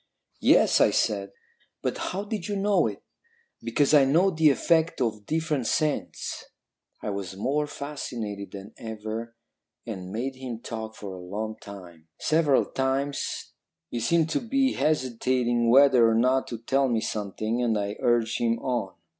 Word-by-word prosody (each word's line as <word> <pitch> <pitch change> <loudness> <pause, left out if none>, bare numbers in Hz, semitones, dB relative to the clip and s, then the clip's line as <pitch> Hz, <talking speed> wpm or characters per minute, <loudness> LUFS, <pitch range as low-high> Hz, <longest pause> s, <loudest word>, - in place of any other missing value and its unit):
"'Yes,' - - +5
I - - +6
said, 100 -2 0 0.5
'but - - 0
how 195 +2 -3
did 205 -4 -4
you 205 - -2
know 200 0 +2
it?' - - -7 0.6
"'Because 145 0 +1
I 145 -2 +8
know 170 +8 +4
the 160 -2 +4
effect 165 +3 +2
of 110 -5 -2
different 155 -6 -1
scents.' 155 -1 -1 0.6
"I 105 - -2
was 95 -1 -5
more 145 +8 0
fascinated 115 -9 -5
than 100 +2 -9
ever, 110 +1 -6 0.5
and 95 -6 -6
made 130 +5 -3
him 125 -3 -6
talk 110 -2 -6
for 100 -3 -7
a 95 - -8
long 105 +4 -4
time. 90 -5 -11
Several 155 -3 +3
times 135 +1 -2 0.4
he 120 - -2
seemed 160 +7 +2
to - - +1
be 265 +3 +1
hesitating 125 -4 +1
whether 130 -2 +6
or 110 - +2
not 130 +3 +2
to 120 - -5
tell 135 +4 +1
me 115 -2 +1
something, 110 +3 -2
and 115 -3 +1
I 100 0 -2
urged 120 -1 +1
him 115 -1 +1
on. 120 -6 -2
120 Hz, 155 wpm, -26 LUFS, 110-145 Hz, 0.6 s, I